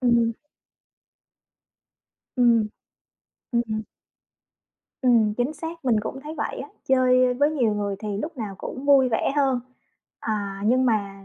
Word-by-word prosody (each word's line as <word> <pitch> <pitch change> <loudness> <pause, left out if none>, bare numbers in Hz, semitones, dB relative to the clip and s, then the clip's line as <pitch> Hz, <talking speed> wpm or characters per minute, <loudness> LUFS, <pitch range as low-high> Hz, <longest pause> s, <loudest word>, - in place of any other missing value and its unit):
Ừm. 235 -2 +3 2.0
Ừm, 235 -3 +4 0.8
ừm, 235 -1 +2
ừm. 215 0 -3 1.2
Ừm, 225 -4 +4
chính 245 +6 -1
xác, 325 0 -7
mình 230 -4 +3
cũng 270 +5 -6
thấy 305 +3 -7
vậy 295 - -3
á, 280 - -7 0.2
chơi 255 -1 +4
với 285 +4 +2
nhiều 240 -9 +1
người 200 -1 -2
thì 210 -2 -4
lúc 305 +7 -5
nào 215 -5 -5
cũng 260 - -6
vui 275 -2 +5
vẻ 225 +3 0
hơn. 270 -3 +2 0.6
À, 200 -2 -3
nhưng 255 +3 +3
mà 200 -4 -1
245 Hz, 140 wpm, -24 LUFS, 215-265 Hz, 2.0 s, vui